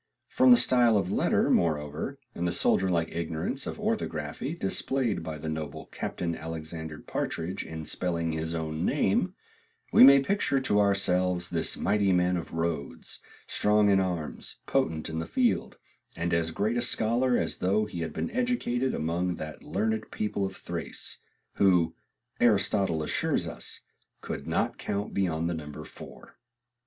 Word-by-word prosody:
From 260 0 +4
the 245 - +9
style 120 - +4
of 95 -2 0
the - - -2
letter, - - +2
moreover, 75 - 0 0.2
and 85 - -2
the - - 0
soldier 95 +2 +2
like 85 -2 0
ignorance 80 -1 -3
of - - -5
orthography - - -2
displayed 130 -6 0
by 80 -1 -5
the 80 - -7
noble 80 -2 -4
Captain 85 -2 -3
Alicxsander 80 -1 -6
Partridg 85 +3 -3
in 80 -1 -7
spelling 85 0 -1
his 80 +1 -3
own 80 0 -3
name, - - +1 0.6
we - - +9
may 140 +1 +10
picture 140 -2 +1
to 105 -6 +2
ourselves 90 -3 +2
this 80 -2 +1
mighty 100 -2 +2
man 90 0 +3
of 85 - -4
Rhodes, 80 -4 -3 0.3
strong 105 0 +3
in 95 - +5
arms, 90 -5 -3
potent 105 - 0
in 80 0 -3
the 80 - -4
field, 250 -2 0 0.4
and 85 +1 -1
as 85 -1 +2
great 105 +8 -1
a - - +1
scholar 120 +1 +2
as - - -2
though 100 +4 +1
he 105 -5 -7
had 80 -1 -3
been 240 - -3
educated 235 - 0
among 85 +3 -1
that 75 0 -7
learned 110 0 -2
people 100 -2 -2
of - - -9
Thrace, - - -5 0.4
who, 90 -4 +4 0.5
Aristotle 100 -7 +2
assures - - 0
us, - - -6 0.4
could - - -6
not - - 0
count 100 +1 -3
beyond 85 -4 0
the 85 - -1
number 75 -1 -7
four. - - -13
90 Hz, 160 wpm, -28 LUFS, 80-105 Hz, 0.6 s, may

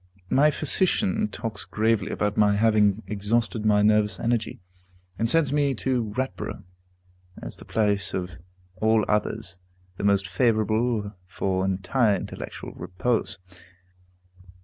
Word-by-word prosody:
My 145 +3 +5
physician 190 +8 +1
talks 115 - -5
gravely 110 -2 0
about 105 0 -1
my 105 -1 +4
having 105 -1 +3
exhausted 105 +3 -1
my 105 -1 +4
nervous 105 0 +3
energy, 115 -2 -1 0.6
and 115 0 +1
sends 150 -1 +3
me 145 -2 +1
to 120 -3 -1
Ratborough, 130 -6 -4 0.8
as - - -8
the - - -13
place 105 -2 0
of 90 -2 -5 0.4
all 110 +1 +2
others 105 -3 -1 0.4
the - - -5
most 100 -1 +2
favorable 110 0 +1
for 95 0 -1
entire 95 +4 +1
intellectual 90 - -7
repose. 100 +1 -2
110 Hz, 120 wpm, -25 LUFS, 100-120 Hz, 0.8 s, My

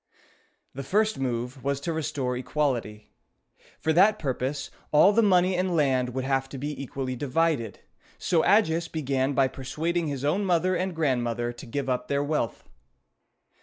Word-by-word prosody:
The 140 - -5
first 215 +8 +1
move 125 0 -3
was 140 0 0
to 165 +3 -2
restore 145 -5 -2
equality. 125 -5 -2 0.7
For 160 - +1
that 200 +6 +5
purpose, 135 -2 -3 0.2
all 155 +7 +6
the 230 - +4
money 185 -3 +3
and 180 -1 0
land 130 -5 +1
would 130 - -1
have 135 0 0
to 135 - -7
be 145 +3 -3
equally 130 -1 -4
divided, 140 - -1 0.4
so 170 -3 +1
Agis 170 -5 +3
began 140 -3 -1
by 135 -1 +3
persuading 160 +6 -2
his 140 -2 -3
own 180 +8 +1
mother 185 0 +2
and 185 0 -2
grandmother 120 -5 0
to 120 - -11
give 140 +4 -3
up 125 -1 -1
their 140 0 0
wealth. 145 -6 -2
140 Hz, 160 wpm, -26 LUFS, 130-165 Hz, 0.7 s, all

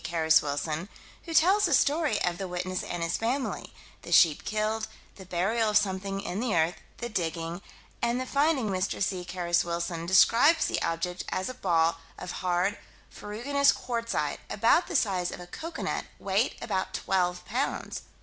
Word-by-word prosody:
Carus 160 -1 +3
Wilson, 150 +5 -3 0.4
who 330 - -5
tells 375 +6 +5
the 325 -6 +4
story 290 -5 +2
of 175 -1 -1
the 195 - -3
witness 180 +1 -3
and 175 -1 -4
his 165 +1 0
family 255 +4 -2 0.3
the - - -10
sheep 160 -4 +5
killed, 215 +1 -1 0.3
the 190 -2 -12
burial 215 +6 +1
of 210 - +4
something 195 -1 -1
in 185 +1 -4
the 230 -5 0
earth, 160 +1 +2 0.2
the 240 - -4
digging, 165 -3 -3 0.4
and 235 +1 +1
the 255 - -2
finding. 280 -4 +1
Mr. 185 0 -1
C. 190 -2 -1
Carus 175 -1 0
Wilson 170 0 -3
describes 240 - +5
the - - -1
object 165 +2 -2
as 185 +6 -2
a - - -5
ball 165 -7 +1 0.2
of 180 - -6
hard, 180 +2 0 0.3
ferruginous 275 +7 +1
quartzite, 230 - -2
about 230 - +3
the 355 - -5
size 190 -9 +1
of - - -7
a 180 - -8
cocoanut, 320 - -4
weight - - 0
about - - -2
twelve 180 -2 0
pounds. 255 +5 -2
190 Hz, 170 wpm, -28 LUFS, 175-235 Hz, 0.4 s, tells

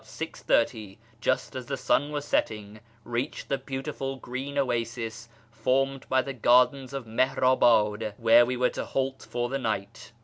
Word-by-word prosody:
30, 110 -4 -1 0.2
just - - -1
as 130 -2 -6
the 135 - -3
sun 145 +3 +1
was 145 -1 -3
setting, 105 -6 -1 0.2
reached 120 +5 -4
the 140 - +1
beautiful 135 0 -4
green 135 +2 -6
oasis 115 -3 -2 0.2
formed 135 +3 0
by 130 0 +3
the 135 - -5
gardens 125 +2 +3
of 135 -3 -5
Mihnibad, 115 -3 +2
where 115 +1 +6
we 125 +1 -1
were 125 0 +2
to - - -4
halt 135 0 -3
for 120 0 -1
tlie 135 +2 -3
night. 110 -1 -4
125 Hz, 150 wpm, -27 LUFS, 115-135 Hz, 0.2 s, where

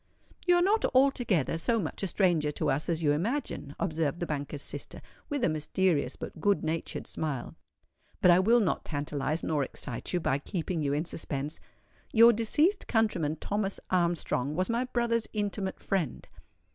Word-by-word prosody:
"You 355 - +6
are 350 - +4
not 420 +4 +3
altogether 240 - +3
so 230 +7 +2
much 165 - -4
a 195 - 0
stranger 170 -6 +2
to - - 0
us 145 +5 -1
as 165 -1 0
you 145 - +4
imagine," 170 - -2
observed 160 -4 -1
the 175 - -1
banker's 145 -2 -4
sister, - - -6 0.3
with 285 -4 -2
a - - +5
mysterious 155 -2 0
but 160 - -8
good 200 +3 +2
natured 160 +1 -3
smile. 145 -6 -4 0.7
"But 180 - +6
I 175 - +6
will 230 +5 +5
not 185 - 0
tantalize, 145 +1 -2
nor 150 -3 +1
excite 125 -1 -4
you 180 - +1
by 140 -4 0
keeping 170 +2 -3
you 140 -1 0
in 150 +3 0
suspense. 145 -3 -3 0.5
Your 230 +1 +8
deceased 295 - +1
countryman 185 -10 +1
Thomas 200 +4 -2
Armstrong 170 -6 0
was 185 +6 0
my 235 +2 0
brother's 235 -2 0
intimate 205 -2 -2
friend." 175 -10 -2
175 Hz, 170 wpm, -29 LUFS, 150-220 Hz, 0.7 s, Your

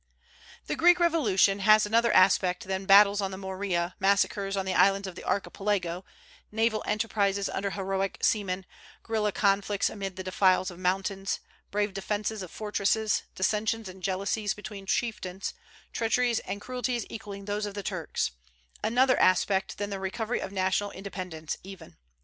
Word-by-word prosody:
The - - -2
Greek 350 +1 +5
revolution 220 - +3
has 215 +2 +6
another 230 +2 +3
aspect 185 -1 +4
than 190 0 -3
battles 200 +1 +7
on 195 - -1
the 190 - -7
Morea, 190 -2 -2
massacres 200 0 +1
on 190 - -1
the 190 - -1
islands 195 0 +3
of 190 - -6
the - - -10
Archipelago, 195 -3 -1 0.5
naval 220 0 +1
enterprises 205 -2 0
under 200 +1 -2
heroic 195 0 -2
seamen, 190 -3 0 0.4
guerilla 215 -2 0
conflicts 200 +1 +1
amid 195 -3 -5
the 185 - -6
defiles 185 0 +2
of 175 - -12
mountains, 195 +1 -1 0.3
brave 205 0 -1
defences 210 +2 -2
of 185 - -7
fortresses, 215 +1 0
dissensions 215 +3 0
and 185 0 -10
jealousies 195 +2 -1
between 205 -2 -9
chieftains, 195 -5 -2 0.4
treacheries 235 +1 +1
and 200 +2 -6
cruelties 250 -1 -2
equalling 200 -3 -8
those 205 +1 -2
of 205 - -7
the 205 - -4
Turks, 180 - -2 0.5
another 255 +3 +3
aspect 190 +1 +2
than 205 0 -3
the 195 - -3
recovery 215 +5 -2
of 190 - -5
national 190 +1 0
independence 180 -5 -6
even. 185 -4 -11
200 Hz, 150 wpm, -28 LUFS, 190-210 Hz, 0.5 s, battles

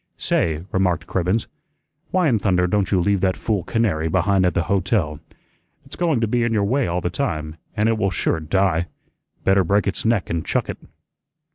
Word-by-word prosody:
"Say," 80 -1 0
remarked 95 -2 +1
Cribbens, 95 +5 0 0.6
"why 185 -3 +2
in 115 -6 +2
thunder 90 -3 +2
don't 100 +1 0
you 95 - +3
leave 100 +1 +1
that 95 -1 +1
fool 105 -5 -1
canary 90 -9 0
behind 95 +2 +2
at 90 - -1
the 85 - +2
hotel? 95 -5 0 0.7
It's 135 - -10
going 165 -7 +1
to 115 - +1
be 120 +3 +1
in 115 -1 +1
your 105 -2 +2
way 130 +6 +1
all 90 +1 -1
the 90 - -2
time, 80 - -3 0.2
an' 105 +1 +2
it 115 -1 +1
will 95 - +2
sure 85 -2 0
die. 85 +1 +1 0.6
Better 95 0 +4
break 100 +4 +2
its 100 - -1
neck 110 -4 +1
an' 85 -1 -1
chuck - - -1
it." - - -5
95 Hz, 200 wpm, -21 LUFS, 85-110 Hz, 0.7 s, Better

